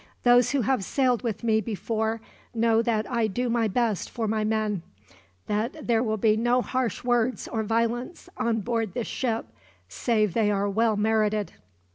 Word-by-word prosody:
Those 245 -1 +5
who 280 -1 +1
have 245 -2 +1
sailed 255 +1 +1
with 235 -2 -3
me 220 -1 +2
before 220 +1 -2 0.3
know 225 0 +3
that 225 -2 0
I 235 -2 +1
do 240 +4 -2
my 230 -1 +2
best 220 -1 0
for 230 -3 -3
my 215 0 0
men, 215 -3 0 0.6
that 230 +9 -2
there 230 -2 +2
will 220 -3 0
be 215 +1 +3
no 240 +2 +2
harsh 255 -5 -2
words 245 0 0
or 225 - -2
violence 230 - -1
on 225 0 0
board 225 -3 -2
this 240 - -2
ship, 230 -3 -2 0.4
save 215 - 0
they 220 -2 +2
are 200 0 +1
well 220 +1 +1
merited. 215 -1 +1
225 Hz, 170 wpm, -26 LUFS, 215-240 Hz, 0.6 s, Those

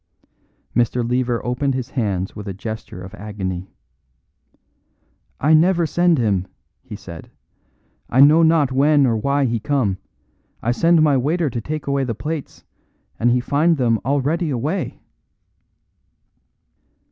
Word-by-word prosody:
Mr. 120 0 +1
Lever 125 -1 -1
opened 125 +2 -1
his 130 -1 -4
hands 100 -7 -2
with 105 -1 -8
a 95 - -5
gesture 110 -3 -7
of 95 - -10
agony. 95 -2 -5 1.7
"I 150 +3 +3
never 170 +2 +4
send 175 +1 +2
him," 100 -6 0 0.3
he - - -9
said. 90 -5 -10 0.8
"I 125 - +1
know 150 +4 +7
not 160 -4 +3
when 145 +2 +4
or 120 -3 +2
why 140 +5 +1
he 115 -2 0
come. 110 -7 0 0.6
I 120 - -1
send 165 +5 +3
my 145 -3 +4
waiter 150 +3 0
to 115 - -3
take 155 +5 -5
away 140 -1 0
the 120 -4 -3
plates, 150 +5 -6 0.6
and 120 - +3
he 125 +1 +3
find 150 +6 +2
them 115 -4 +2
already 145 - 0
away." 150 +8 -3
130 Hz, 135 wpm, -20 LUFS, 110-150 Hz, 1.7 s, know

